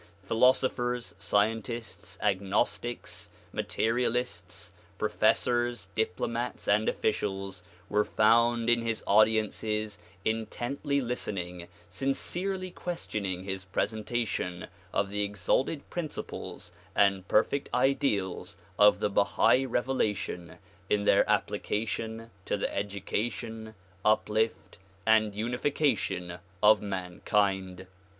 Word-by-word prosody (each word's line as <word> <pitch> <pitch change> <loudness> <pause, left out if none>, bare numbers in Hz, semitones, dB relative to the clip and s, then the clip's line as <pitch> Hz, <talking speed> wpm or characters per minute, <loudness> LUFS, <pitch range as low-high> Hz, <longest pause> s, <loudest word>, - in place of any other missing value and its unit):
Philoso 125 +3 +5
phers, 120 -6 -3
scientists, 110 +4 -1
agnostics, 105 +4 -1 0.2
materialists, 110 -7 -1 0.3
professors, 120 -5 +1
diplomats 115 +3 -2
and 105 +2 +3
officials 95 -3 -2 0.3
were 105 0 +2
found 115 +2 +3
in 120 0 +4
his 115 -1 -2
audiences 110 0 +2 0.3
intently 120 +6 -1
listening, 90 -8 -3 0.2
sincerely 185 +7 -2
questioning 100 - -4
his 95 -1 -4
presentation 105 -2 -2 0.3
of 100 0 0
the 105 0 -1
exalted 105 - 0
principles 165 -4 -5 0.2
and 100 -2 +3
perfect 135 +6 +2
ideals 115 -8 0 0.2
of 105 0 +6
the - - +2
Bahai 125 +6 +3
revelation 110 -8 -1 0.3
in 105 -1 +2
their - - +4
application 115 +1 -1
to - - 0
the - - -2
education, 110 +3 -3 0.3
uplift 110 0 +1 0.3
and 110 -2 +4
unification 115 - 0 0.2
of 105 0 +7
mankind. 95 0 -1
110 Hz, 90 wpm, -29 LUFS, 100-120 Hz, 0.3 s, of